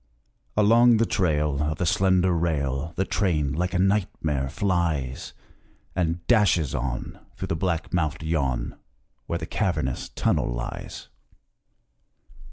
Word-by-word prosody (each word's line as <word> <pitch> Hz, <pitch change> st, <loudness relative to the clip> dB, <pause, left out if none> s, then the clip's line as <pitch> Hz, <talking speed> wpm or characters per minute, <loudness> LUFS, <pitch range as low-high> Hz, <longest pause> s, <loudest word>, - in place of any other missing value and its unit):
Along 115 Hz, +3 st, +6 dB
the 115 Hz, -, +3 dB
trail 75 Hz, -8 st, +1 dB
Of 75 Hz, 0 st, -1 dB
the 90 Hz, -, -1 dB
slender 95 Hz, +1 st, +3 dB
rail 75 Hz, -3 st, -1 dB
The 95 Hz, -, 0 dB
train, 80 Hz, -10 st, 0 dB
like 90 Hz, +4 st, -1 dB
a -, -, +3 dB
nightmare, 90 Hz, -8 st, 0 dB
flies 80 Hz, -7 st, -1 dB, 0.6 s
And 85 Hz, -1 st, -1 dB
dashes 95 Hz, -, +3 dB
on 65 Hz, 0 st, -4 dB, 0.2 s
Through -, -, -5 dB
the -, -, 0 dB
black 85 Hz, -1 st, -2 dB
mouthed 80 Hz, -4 st, 0 dB
yawn 70 Hz, -6 st, -1 dB, 0.5 s
Where 85 Hz, -, -1 dB
the 85 Hz, -, -5 dB
cavernous 80 Hz, -, -1 dB
tunnel -, -, 0 dB
lies. -, -, -6 dB
85 Hz, 125 wpm, -25 LUFS, 75-95 Hz, 0.6 s, Along